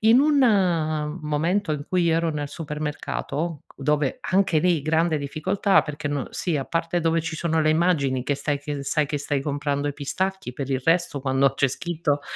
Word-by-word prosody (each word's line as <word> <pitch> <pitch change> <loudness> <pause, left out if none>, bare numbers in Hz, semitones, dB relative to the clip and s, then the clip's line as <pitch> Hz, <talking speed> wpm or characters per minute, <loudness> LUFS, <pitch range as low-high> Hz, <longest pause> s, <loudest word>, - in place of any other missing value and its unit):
in 225 +3 +7
un, 290 0 +4
uhm, 165 -8 +2
momento 160 +5 0
in 145 -1 -3
cui 180 -1 +2
io 165 -1 +3
ero 165 0 +1
nel 145 -1 -3
supermercato, 150 0 -4
dove 145 0 0 0.2
anche 185 -4 +3
lì 175 -1 +2
grande 160 +1 +2
difficoltà 185 +8 +1
perché 150 -1 -5
n 145 -2 -2
sì, 170 -4 -1
a 135 - -2
parte 165 +3 -1
dove 165 0 +2
ci 160 0 -4
sono 160 0 0
le 155 0 +3
immagini 155 -6 +2
che 145 - 0
stai 145 +1 -1
che 145 -1 -4
sai 150 +2 +1
che 145 0 -2
stai 145 -1 -1
comprando 145 0 -1
i - - -2
pistacchi, 190 +2 -3
per 135 0 -4
il 130 -1 0
resto 165 -3 +2
quando 135 0 +2
c'è 135 -1 +2
scritto 155 0 -1
155 Hz, 195 wpm, -24 LUFS, 145-170 Hz, 0.2 s, in